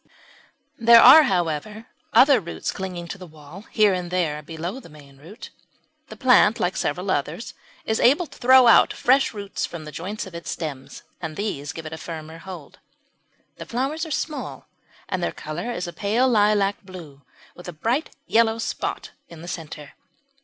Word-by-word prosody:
There 235 Hz, 0 st, +8 dB
are, 260 Hz, +7 st, +10 dB
however, 185 Hz, -, -2 dB, 0.3 s
other 270 Hz, -1 st, +6 dB
roots 170 Hz, -4 st, -5 dB
clinging 180 Hz, -3 st, -6 dB
to 195 Hz, -, -7 dB
the 185 Hz, -, -10 dB
wall 155 Hz, +6 st, -13 dB
here 210 Hz, -3 st, +3 dB
and 180 Hz, -1 st, -4 dB
there 165 Hz, -5 st, -1 dB
below 165 Hz, -, -6 dB
the 215 Hz, -, -15 dB
main 140 Hz, -3 st, -17 dB
root. 175 Hz, +9 st, -12 dB, 0.6 s
The -, -, -10 dB
plant, 245 Hz, -4 st, +4 dB
like 180 Hz, +1 st, -1 dB
several 180 Hz, +6 st, -2 dB
others, 160 Hz, +7 st, -3 dB, 0.3 s
is 220 Hz, -, -1 dB
able 290 Hz, +9 st, +4 dB
to -, -, -16 dB
throw 260 Hz, +1 st, +6 dB
out 235 Hz, -, +6 dB
fresh 265 Hz, +2 st, +2 dB
roots 205 Hz, -2 st, -5 dB
from 165 Hz, -3 st, -9 dB
the 155 Hz, -, -8 dB
joints 185 Hz, +8 st, -6 dB
of 190 Hz, -, -12 dB
its 170 Hz, 0 st, -8 dB
stems, 145 Hz, -5 st, -6 dB, 0.2 s
and 160 Hz, -2 st, -5 dB
these 150 Hz, -8 st, -4 dB
give 160 Hz, 0 st, -9 dB
it 155 Hz, -, -7 dB
a 160 Hz, -, -7 dB
firmer 160 Hz, 0 st, -8 dB
hold. 175 Hz, -5 st, -11 dB, 0.8 s
The -, -, -8 dB
flowers 270 Hz, +7 st, -2 dB
are 325 Hz, -, -5 dB
small, 305 Hz, 0 st, -5 dB, 0.4 s
and 185 Hz, -, -3 dB
their -, -, -1 dB
colour 155 Hz, +10 st, -6 dB
is 180 Hz, -6 st, -4 dB
a 175 Hz, -, -7 dB
pale 215 Hz, +8 st, +1 dB
lilac 205 Hz, -3 st, +2 dB
blue 170 Hz, -8 st, -12 dB, 0.3 s
with 175 Hz, -, -12 dB
a -, -, -5 dB
bright 230 Hz, -, -2 dB, 0.2 s
yellow 225 Hz, 0 st, +2 dB
spot 230 Hz, -, -4 dB, 0.2 s
in 170 Hz, -1 st, -12 dB
the -, -, -9 dB
centre. 155 Hz, -4 st, -8 dB
185 Hz, 180 wpm, -23 LUFS, 160-225 Hz, 0.8 s, are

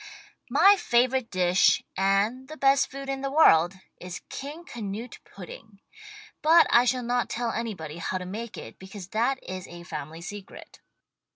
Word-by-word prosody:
My 400 Hz, +1 st, +6 dB
favorite 250 Hz, -1 st, +1 dB
dish, 180 Hz, 0 st, +3 dB
and 200 Hz, +7 st, +1 dB
the 310 Hz, +2 st, -9 dB
best 275 Hz, -1 st, +3 dB
food 275 Hz, +1 st, -8 dB
in 270 Hz, 0 st, -3 dB
the 275 Hz, -, -2 dB
world, 195 Hz, -, +5 dB, 0.2 s
is 180 Hz, 0 st, -8 dB
King 295 Hz, +5 st, -7 dB
Canute 225 Hz, -, -7 dB
Pudding, 200 Hz, +2 st, -12 dB, 0.6 s
but 325 Hz, +2 st, +6 dB
I 240 Hz, +1 st, +6 dB
shall 250 Hz, 0 st, 0 dB
not 245 Hz, +1 st, -1 dB
tell 235 Hz, -1 st, -2 dB
anybody 190 Hz, -10 st, -5 dB
how 180 Hz, +2 st, -2 dB
to 180 Hz, -, -6 dB
make 215 Hz, +5 st, -7 dB
it, -, -, -10 dB
because 190 Hz, -1 st, -10 dB
that 235 Hz, +6 st, 0 dB
is 185 Hz, 0 st, -7 dB
a 175 Hz, 0 st, -11 dB
family 155 Hz, 0 st, -7 dB
secret. 200 Hz, +2 st, -10 dB
225 Hz, 160 wpm, -26 LUFS, 185-265 Hz, 0.6 s, My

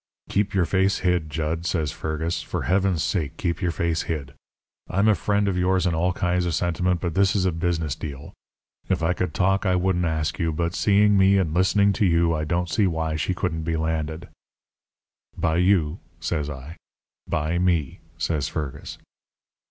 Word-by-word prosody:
"'Keep 100 Hz, 0 st, 0 dB
your 90 Hz, -3 st, +3 dB
face 95 Hz, +2 st, +2 dB
hid, 90 Hz, -3 st, +1 dB
Jud,' 80 Hz, +2 st, -2 dB
says 80 Hz, -4 st, 0 dB
Fergus. 80 Hz, +2 st, -3 dB
'For -, -, -4 dB
heaven's 95 Hz, -4 st, +1 dB
sake, 80 Hz, -3 st, -2 dB
keep 85 Hz, -, -2 dB
your 90 Hz, -, +1 dB
face 85 Hz, 0 st, 0 dB
hid. 70 Hz, -4 st, -3 dB, 0.6 s
I'm 100 Hz, +4 st, +2 dB
a 110 Hz, -, +6 dB
friend 100 Hz, 0 st, 0 dB
of 90 Hz, -2 st, 0 dB
yours 95 Hz, 0 st, +2 dB
in 90 Hz, -, +1 dB
all 85 Hz, +3 st, +1 dB
kinds 90 Hz, -1 st, 0 dB
of 85 Hz, -, 0 dB
sentiment, 90 Hz, +1 st, 0 dB
but 85 Hz, -3 st, -2 dB
this 95 Hz, +2 st, +3 dB
is 95 Hz, -2 st, +2 dB
a 95 Hz, -, +2 dB
business 80 Hz, -3 st, -1 dB
deal. 70 Hz, -2 st, -8 dB, 0.6 s
If -, -, 0 dB
I 85 Hz, +2 st, +2 dB
could 90 Hz, -3 st, -3 dB
talk 95 Hz, +1 st, +2 dB
I 90 Hz, -2 st, +2 dB
wouldn't 90 Hz, -1 st, +1 dB
ask 80 Hz, -1 st, -1 dB
you. 80 Hz, -1 st, +1 dB
But 85 Hz, +2 st, -1 dB
seeing 105 Hz, 0 st, +4 dB
me 95 Hz, +1 st, +5 dB
and 85 Hz, -5 st, 0 dB
listening 100 Hz, +3 st, +3 dB
to 105 Hz, -, +1 dB
you 85 Hz, -1 st, +3 dB
I 75 Hz, -1 st, -1 dB
don't 90 Hz, +2 st, 0 dB
see 100 Hz, +3 st, +2 dB
why 80 Hz, -2 st, -1 dB
she 80 Hz, +4 st, -1 dB
can't 80 Hz, -3 st, -2 dB
be 80 Hz, 0 st, -1 dB
landed.' 80 Hz, 0 st, -2 dB, 1.1 s
"'By 80 Hz, -, +1 dB
you?' 90 Hz, -3 st, +2 dB, 0.2 s
says 80 Hz, -2 st, -2 dB
I. 75 Hz, +4 st, -8 dB, 0.5 s
"'By 80 Hz, +3 st, -1 dB
me,' 85 Hz, -7 st, 0 dB, 0.2 s
says 75 Hz, -4 st, -1 dB
Fergus. 75 Hz, -5 st, -5 dB
85 Hz, 185 wpm, -24 LUFS, 80-95 Hz, 1.1 s, a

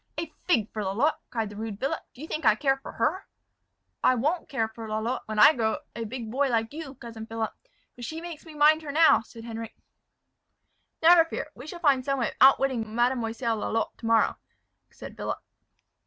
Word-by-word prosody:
"A 320 Hz, -1 st, -4 dB
fig 230 Hz, -, +3 dB
for 215 Hz, -, -3 dB
Lalotte!" 225 Hz, +11 st, +1 dB
cried 225 Hz, -3 st, -3 dB
the -, -, -10 dB
rude 215 Hz, -1 st, -5 dB
Philip; 285 Hz, +5 st, -1 dB, 0.2 s
"do 260 Hz, -, -12 dB
you -, -, -6 dB
think 310 Hz, -1 st, -4 dB
I 215 Hz, -, +5 dB
care 270 Hz, +2 st, +1 dB
for 270 Hz, -, -10 dB
her?" 325 Hz, +12 st, -1 dB, 0.8 s
"I 255 Hz, -, +5 dB
won't 300 Hz, +8 st, -1 dB
care 230 Hz, -6 st, 0 dB
for 220 Hz, 0 st, -9 dB
Lalotte 220 Hz, +3 st, -2 dB
when 215 Hz, 0 st, -4 dB
I 210 Hz, +9 st, +8 dB
grow 220 Hz, -4 st, 0 dB, 0.2 s
a -, -, -6 dB
great 225 Hz, -2 st, -4 dB
big 230 Hz, -2 st, -6 dB
boy 275 Hz, +3 st, +1 dB
like 225 Hz, 0 st, 0 dB
you, 300 Hz, -3 st, -7 dB
cousin 230 Hz, -3 st, -9 dB
Philip; 225 Hz, -1 st, -3 dB, 0.4 s
but 245 Hz, -, -10 dB
she 315 Hz, +7 st, -5 dB
makes 335 Hz, -2 st, -8 dB
me 320 Hz, -2 st, -12 dB
mind 305 Hz, +2 st, +5 dB
her 300 Hz, -2 st, -6 dB
now," 320 Hz, +2 st, +6 dB
said 225 Hz, +1 st, -13 dB
Henric. 225 Hz, -1 st, -7 dB, 1.3 s
"Never 335 Hz, 0 st, +8 dB
fear; 325 Hz, -, -5 dB
we 255 Hz, +5 st, -11 dB
will 350 Hz, -, -7 dB
find 285 Hz, -6 st, +3 dB
some 275 Hz, +1 st, 0 dB
way 240 Hz, -, 0 dB
of -, -, -12 dB
outwitting 260 Hz, -5 st, +4 dB
Mademoiselle 235 Hz, -1 st, 0 dB
Lalotte 225 Hz, +1 st, -2 dB
to 230 Hz, -, -5 dB
morrow," 230 Hz, 0 st, +3 dB, 0.5 s
said -, -, -11 dB
Philip. -, -, -3 dB
245 Hz, 205 wpm, -27 LUFS, 225-295 Hz, 1.3 s, I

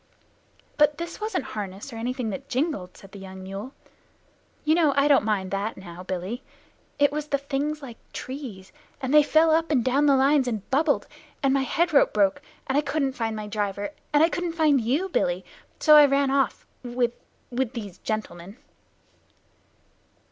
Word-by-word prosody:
"But 295 Hz, 0 st, +4 dB
this 340 Hz, +5 st, -6 dB
wasn't 425 Hz, -8 st, -1 dB
harness 205 Hz, +4 st, -6 dB
or -, -, -7 dB
anything 245 Hz, -1 st, -2 dB
that 275 Hz, +5 st, -7 dB
jingled," 255 Hz, -, -2 dB
said 195 Hz, -, -15 dB
the 200 Hz, -, -10 dB
young 190 Hz, 0 st, -9 dB
mule. 195 Hz, +6 st, -6 dB, 0.9 s
"You 310 Hz, -, +4 dB
know 320 Hz, -4 st, +3 dB
I 280 Hz, +1 st, +4 dB
don't 285 Hz, -2 st, +5 dB
mind 200 Hz, -3 st, -1 dB
that 200 Hz, +3 st, -2 dB
now, 175 Hz, -2 st, -10 dB
Billy. 185 Hz, +6 st, -4 dB, 0.6 s
It 285 Hz, -1 st, +4 dB
was 300 Hz, 0 st, -3 dB
Things 285 Hz, +1 st, -2 dB
like 240 Hz, -4 st, -9 dB
trees, 250 Hz, -9 st, -7 dB, 0.3 s
and 265 Hz, 0 st, -2 dB
they 300 Hz, -, +9 dB
fell 315 Hz, +2 st, +4 dB
up 325 Hz, +1 st, +2 dB
and 260 Hz, -7 st, +2 dB
down 275 Hz, +3 st, +3 dB
the 280 Hz, -, +6 dB
lines 270 Hz, 0 st, +3 dB
and 220 Hz, -5 st, -3 dB
bubbled; 290 Hz, +2 st, +2 dB, 0.4 s
and 270 Hz, -1 st, +3 dB
my 275 Hz, -, +2 dB
head 335 Hz, +5 st, 0 dB
rope 280 Hz, -, +4 dB
broke, 200 Hz, -2 st, +2 dB, 0.2 s
and 265 Hz, -, -1 dB
I 290 Hz, -, +4 dB
couldn't 280 Hz, -2 st, -1 dB
find 225 Hz, -3 st, -2 dB
my 215 Hz, -1 st, -5 dB
driver, 205 Hz, +1 st, -3 dB, 0.2 s
and 295 Hz, 0 st, +5 dB
I 330 Hz, -, +5 dB
couldn't 350 Hz, -1 st, -2 dB
find 305 Hz, -5 st, +3 dB
you, 275 Hz, +12 st, 0 dB
Billy, -, -, -1 dB, 0.3 s
so 305 Hz, -1 st, +7 dB
I 295 Hz, -1 st, +9 dB
ran 275 Hz, 0 st, +2 dB
off 275 Hz, -1 st, 0 dB, 0.2 s
with 240 Hz, -1 st, -1 dB, 0.4 s
with 250 Hz, 0 st, -1 dB
these 205 Hz, -7 st, -7 dB
gentlemen." 200 Hz, -2 st, -5 dB
265 Hz, 175 wpm, -25 LUFS, 215-295 Hz, 0.9 s, they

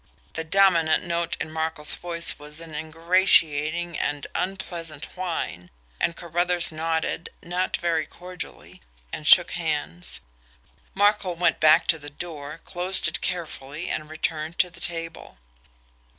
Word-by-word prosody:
The 160 Hz, -, -3 dB
dominant 165 Hz, -2 st, +4 dB
note 170 Hz, -1 st, -1 dB
in 155 Hz, -, -4 dB
Markel's 160 Hz, -1 st, 0 dB
voice 170 Hz, -2 st, +2 dB
was 150 Hz, +1 st, -2 dB
an 165 Hz, -1 st, -10 dB
ingratiating 165 Hz, 0 st, +2 dB
and 145 Hz, -1 st, -1 dB
unpleasant 170 Hz, -5 st, -4 dB
whine, 165 Hz, -, -4 dB, 0.3 s
and 170 Hz, -, +1 dB
Carruthers 175 Hz, +1 st, +2 dB
nodded, 160 Hz, +1 st, -2 dB
not 180 Hz, +1 st, -1 dB
very 165 Hz, -2 st, 0 dB
cordially 180 Hz, 0 st, -9 dB, 0.3 s
and -, -, -4 dB
shook -, -, +8 dB
hands. 80 Hz, +4 st, -2 dB, 0.8 s
Markel 205 Hz, -2 st, +3 dB
went 175 Hz, +1 st, +2 dB
back 155 Hz, 0 st, +6 dB
to 160 Hz, -, +2 dB
the 145 Hz, 0 st, -8 dB
door, 150 Hz, 0 st, -7 dB
closed 180 Hz, +1 st, 0 dB
it 155 Hz, -, -3 dB
carefully, 160 Hz, -3 st, -4 dB
and 155 Hz, -, -3 dB
returned 155 Hz, +1 st, -3 dB
to 180 Hz, -, +2 dB
the 170 Hz, 0 st, -12 dB
table. 165 Hz, -1 st, -4 dB
165 Hz, 130 wpm, -25 LUFS, 155-175 Hz, 0.8 s, shook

